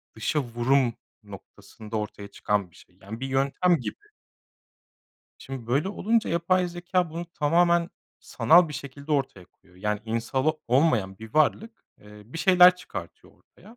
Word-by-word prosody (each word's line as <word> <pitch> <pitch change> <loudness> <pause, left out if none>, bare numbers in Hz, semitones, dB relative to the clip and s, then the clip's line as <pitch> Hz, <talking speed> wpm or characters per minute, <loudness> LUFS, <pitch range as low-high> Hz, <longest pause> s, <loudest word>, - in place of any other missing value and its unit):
dışavurum 120 0 0 0.3
noktasında 105 +2 -10
ortaya 105 -1 -6
çıkan 100 -2 -2
bir - - -23
şey. 90 - -20
Yani, 110 +4 -8
bir 135 - -4
yöntem 140 +7 +1
gibi. 420 +1 -8 1.3
Şimdi, 135 -4 -8
böyle 140 +9 0
olunca 220 +3 0
yapay 180 +2 +1
zekâ 175 0 -2
bunu 170 +2 -6
tamamen 170 +3 +2 0.3
sanal 170 0 +4
bir - - -7
şekilde 140 +3 -7
ortaya 130 -10 -2
koyuyor. 90 0 -27
Yani, 105 0 -1
insan 115 +4 -2
o 155 0 +1
olmayan 120 -8 +2
bir 110 0 -12
varlık, 220 +9 0 0.2
eee, 105 0 -14
bir 130 +8 -8
şeyler 180 +1 +6
çıkartıyor 100 - -10
ortaya. 215 +6 -20
140 Hz, 145 wpm, -26 LUFS, 110-175 Hz, 1.3 s, şeyler